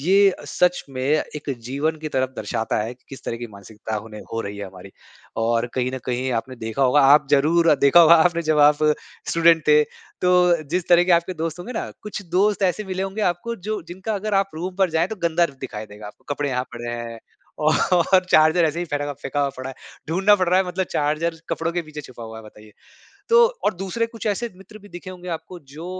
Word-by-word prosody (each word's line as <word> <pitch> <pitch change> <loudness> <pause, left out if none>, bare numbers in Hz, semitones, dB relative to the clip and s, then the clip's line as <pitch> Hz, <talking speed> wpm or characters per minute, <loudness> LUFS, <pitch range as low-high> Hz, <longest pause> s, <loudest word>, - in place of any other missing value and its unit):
ये 195 +5 +4
सच 180 0 +1
में 130 -1 -5
एक 150 +1 -1
जीवन 145 +6 -1
की 155 - -4
तरफ 130 -2 -1
दर्शाता 110 +1 -2
है 115 +3 -5
कि 125 - -36
किस 135 - -11
तरह 115 - -3
की 120 0 -6
मानसिकता 105 +2 -7
उन्हें 105 0 -10
हो 115 - -1
रही 100 -1 -6
है 100 - -5
हमारी। 95 +1 -12 0.5
और 115 +1 +1
कहीं 125 -1 0
न 130 - -4
कहीं 125 +1 -2
आपने 125 +2 -3
देखा 115 +3 -3
होगा 135 +3 +4
आप 150 -1 +3
ज़रूर 155 +3 +4
देखा 140 +5 +7
होगा 165 0 +8
आपने 170 +1 +3
जब 155 -1 +1
आप 145 0 +6 0.5
स्टूडेंट 165 -1 +4
थे। 150 0 +6 0.4
तो 180 -2 +4
जिस 180 0 -1
तरह 175 0 +6
के 180 - +3
आपके 170 +2 +2
दोस्त 165 +1 -4
होंगे 225 +8 -7
ना 225 - -4
कुछ 210 -1 -6
दोस्त 200 0 +2
ऐसे 190 +3 +1
मिले 190 0 -3
होंगे 195 +2 -4
आपको 235 +7 -6
जो 215 -1 -1
जिनका 190 +5 -4
अगर 210 +1 -2
आप 195 0 +2
रूम 180 +3 -5
पर 190 -2 +2
जाएँ 165 +2 +1
तो 220 - -5
गंदा 170 +1 +2
र 160 - -3
दिखाई 110 -5 -6
देगा। 105 +1 -11
आपको 105 - -13
कपड़े 145 0 -2
यहाँ 125 0 -1
पड़े 120 0 -5
हैं 120 -1 -6 0.5
और 180 +3 +3
चार्जर 160 +2 +5
ऐसे 160 +1 -1
ही 175 - -1
फेंटा 145 -2 -3
फेंका 140 +1 -2
व - - -2
पड़ा 130 +1 -6
है। 135 - -10 0.3
ढूँढ़ना 190 +5 +4
पड़ 185 -2 0
रहा 185 - +4
है 190 - +2
मतलब 185 +1 -2
चार्जर 155 +3 0
कपड़ों 165 0 -2
के 175 - -1
पीछे 155 -1 -8
छुपा 125 -4 -12
हुआ 110 0 -9
है - - -11
बताइए। 105 0 -15 0.6
तो 470 +1 +7 0.2
और 205 - +2
दूसरे 195 +5 -2
कुछ 230 -1 -9
ऐसे 215 +3 -1
मित्र 200 +3 -14
भी 205 0 -16
दिखे 185 0 -9
होंगे 180 -1 -10
आपको 165 +2 -6 0.2
जो 165 +3 -8
160 Hz, 230 wpm, -22 LUFS, 130-180 Hz, 0.6 s, होगा